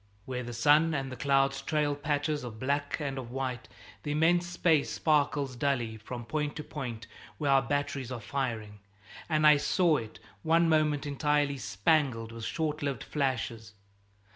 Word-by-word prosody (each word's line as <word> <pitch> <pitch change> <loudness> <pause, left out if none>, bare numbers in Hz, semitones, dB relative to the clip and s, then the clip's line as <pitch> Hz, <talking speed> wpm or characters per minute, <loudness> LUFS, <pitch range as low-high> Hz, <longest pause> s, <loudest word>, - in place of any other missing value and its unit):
Where 125 -1 -3
the 120 -1 -6
sun 150 +7 +4
and 135 -1 -3
the - - -5
clouds 135 +1 +2
trail 150 0 0
patches 145 0 -1
of 115 -3 -7
black 140 +4 -1
and 140 -3 -3
of 120 -3 -7
white, 130 -1 -4 0.3
the 145 - -3
immense 175 +3 +3
space 165 -4 +2
sparkles 145 -3 +1
dully 120 -4 -1
from 120 +2 -7
point 150 +3 -2
to 150 - -5
point 120 -8 -6 0.3
where 145 -3 +1
our 135 0 +6
batteries 135 -1 -2
are 125 - -4
firing, 115 -6 -4 0.5
and 155 -1 +2
I 150 -1 +8
saw 165 +2 +2
it 110 -3 -7 0.2
one 165 +1 +3
moment 155 -2 +2
entirely 145 -1 0
spangled 115 +3 +1
with 115 -1 -7
short 155 +4 -2
lived 140 -2 -2
flashes. 115 -6 -2
140 Hz, 165 wpm, -30 LUFS, 125-150 Hz, 0.5 s, I